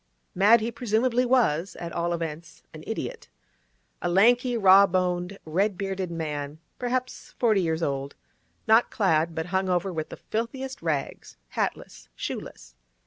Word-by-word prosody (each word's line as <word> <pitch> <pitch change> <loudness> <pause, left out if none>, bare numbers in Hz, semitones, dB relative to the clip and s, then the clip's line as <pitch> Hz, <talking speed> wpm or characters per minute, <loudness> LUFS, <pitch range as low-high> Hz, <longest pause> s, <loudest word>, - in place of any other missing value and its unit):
Mad 215 +5 +5
he 230 +2 -2
presumably 240 +2 +1
was—at 175 -8 +1
all 170 +1 -1
events, 165 -1 -5
an - - -10
idiot. - - -5 0.7
A 175 - -1
lanky, 240 +6 +4
raw 195 -1 +7
boned, 180 +1 -1
red 190 +5 0
beaded 195 -2 -3
man, 150 -3 -4 0.2
perhaps 255 +1 -3
forty 220 -5 +3
years 165 -1 -1
old; 140 -1 -2 0.5
not 225 +2 +5
clad, 165 -5 +1
but 160 - -2
hung 190 0 +1
over 180 +1 0
with 155 -2 -4
the - - -8
filthiest 260 +4 -4
rags; 155 -4 -3
hatless, - - -4
shoeless. - - -7
185 Hz, 140 wpm, -26 LUFS, 165-225 Hz, 0.7 s, raw